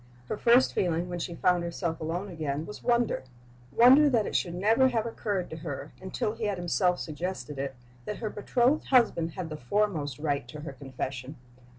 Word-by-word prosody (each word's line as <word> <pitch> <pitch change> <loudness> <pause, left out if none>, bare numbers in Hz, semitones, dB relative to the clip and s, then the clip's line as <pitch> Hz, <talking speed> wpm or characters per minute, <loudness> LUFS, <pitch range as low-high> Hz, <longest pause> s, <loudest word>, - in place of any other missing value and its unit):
Her - - -1
first 240 +4 +4
feeling, 175 -1 0
when 175 0 -4
she 170 0 -4
found 180 +1 +2
herself 170 -1 -3
alone 170 +5 -3
again, 155 -2 -3
was 210 - -9
wonder 240 - +1 0.5
wonder 265 +5 +7
that 230 -6 +2
it - - -4
should 175 -1 0
never 225 +8 +4
have 230 -3 0
occurred 205 -5 -2
to 160 - -5
her, 155 -4 -6
until 210 +4 -2
he 225 -1 -4
had 205 -2 -1
himself 180 +1 +1
suggested 155 -2 -5
it, 135 -1 -3 0.3
that 210 - -4
her 215 -3 -4
betrothed 245 +7 +1
husband 220 - +3
had 180 -4 -5
the 155 - -4
foremost 150 -2 -1
right 145 -4 -1
to 150 +4 -8
her 150 -2 -7
confession. 130 +1 -6
175 Hz, 190 wpm, -28 LUFS, 155-215 Hz, 0.5 s, wonder